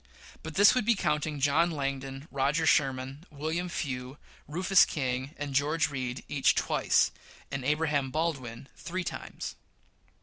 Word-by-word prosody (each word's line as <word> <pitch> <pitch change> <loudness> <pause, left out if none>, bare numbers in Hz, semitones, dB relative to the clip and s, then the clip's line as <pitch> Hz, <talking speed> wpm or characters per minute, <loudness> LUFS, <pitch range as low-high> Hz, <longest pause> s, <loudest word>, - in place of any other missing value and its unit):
But 160 -1 -8
this 205 +1 +7
would 255 - +1
be 235 +2 +3
counting, 150 -4 -1
John 145 +5 +3
Langdon, 135 -2 -4
Roger 140 +4 +1
Sherman, 135 -1 +1
William 160 +4 -3
Few, 130 -4 -4 0.3
Rufus 185 +5 +4
King, 130 0 -2
and 145 -1 -4
George 155 +3 +1
Read, 130 -2 -4
each 140 -2 +2
twice, - - +2 0.4
and 135 -1 -3
Abraham 150 -1 +1
Baldwin 140 -6 -3
three 185 +1 -4
times. - - -6
145 Hz, 135 wpm, -29 LUFS, 135-160 Hz, 0.4 s, this